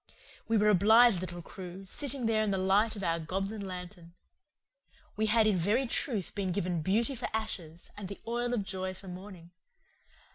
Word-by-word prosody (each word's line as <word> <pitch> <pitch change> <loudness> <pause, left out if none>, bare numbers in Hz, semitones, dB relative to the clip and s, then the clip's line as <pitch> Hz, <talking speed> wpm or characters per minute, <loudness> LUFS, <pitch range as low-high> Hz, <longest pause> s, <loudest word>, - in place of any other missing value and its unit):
We 225 - +3
were 210 0 +4
a - - +6
blithe 220 +1 +6
little 175 -1 -6
crew, 185 +2 -9
sitting 270 +4 -1
there 220 -1 +2
in 215 - +1
the 195 - +1
light 200 +4 +2
of 200 - -6
our 165 -1 +1
goblin 195 +6 -3
lantern. 180 -2 -8 1.0
We 220 0 +1
had 220 +1 +4
in 215 -2 +3
very 210 +10 +2
truth 230 -5 -1
been 195 -3 -2
given 175 -2 -1
beauty 220 - +1
for 245 -1 -4
ashes 175 -7 -4
and 205 -2 -6
the 200 - -8
oil 240 +1 -1
of 210 - -1
joy 190 -1 -4
for 190 +1 -13
mourning. 180 -2 -10
195 Hz, 185 wpm, -31 LUFS, 180-220 Hz, 1.0 s, a